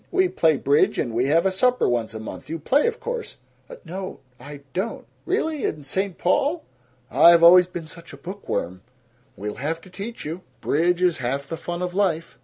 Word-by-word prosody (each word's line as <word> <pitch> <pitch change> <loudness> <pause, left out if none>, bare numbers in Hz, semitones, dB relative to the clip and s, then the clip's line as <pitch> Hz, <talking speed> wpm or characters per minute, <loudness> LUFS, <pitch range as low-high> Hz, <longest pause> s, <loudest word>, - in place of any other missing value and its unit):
We 375 -1 +2
play 160 - +2
bridge 140 +2 +2
and 120 - -1
we 120 +3 +1
have 165 +5 +3
a 190 - +3
supper 250 +6 +2
once 115 -2 -1
a - - -5
month. 130 +5 -8
You 165 - -3
play, 270 - +2
of 470 0 -2
course?" 485 -1 -5 0.3
"N - - -9
no, 190 0 -6 0.2
I 145 +2 -10
don't." 195 +5 -3 0.2
"Really? 310 -4 -1
In 150 -1 -2
St. 190 +6 -2
Paul?" 295 +3 +1 0.5
"I've 170 +5 +7
always 180 +1 +8
been 175 -2 -7
such 165 +2 -11
a 140 - -11
book 185 +8 -9
worm." 90 -1 -2 0.6
"We'll 105 +1 -5
have 160 +3 -2
to 185 - -16
teach 215 +5 -7
you. 165 +4 -5 0.2
Bridge 175 +6 +1
is 175 -5 +2
half 135 +3 -2
the 165 - -5
fun 175 +2 -5
of 180 0 -3
life." 175 -4 -1
170 Hz, 205 wpm, -23 LUFS, 145-195 Hz, 0.6 s, always